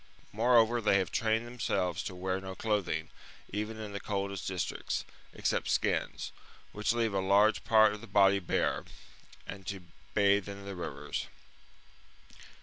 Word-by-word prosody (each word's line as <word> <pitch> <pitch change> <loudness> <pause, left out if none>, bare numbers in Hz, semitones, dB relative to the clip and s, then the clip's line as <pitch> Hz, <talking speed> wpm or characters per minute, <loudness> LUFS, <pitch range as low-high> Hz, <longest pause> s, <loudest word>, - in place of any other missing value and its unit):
Moreover, 115 +1 +4
they 100 -2 +4
have 95 -4 -1
trained 110 +1 +1
themselves 105 -8 -1
to 95 - -5
wear 95 +1 -2
no 95 0 -6
clothing, 95 -8 -1 0.4
even 105 +2 -3
in 105 -2 -6
the 100 - -3
coldest 100 -2 -3
districts, 90 -4 -2 0.3
except - - -1
skins, - - 0 0.4
which 105 +2 0
leave 115 -3 +1
a 95 - +1
large 100 +3 +4
part 110 -2 +5
of 105 - -8
the - - -10
body 100 -1 +5
bare, 90 - 0 0.6
and 95 -1 -8
to 95 -2 -4 0.3
bathe 100 0 +3
in 100 0 -8
the 100 -1 -5
rivers. 75 -4 -4
100 Hz, 145 wpm, -31 LUFS, 95-110 Hz, 0.6 s, part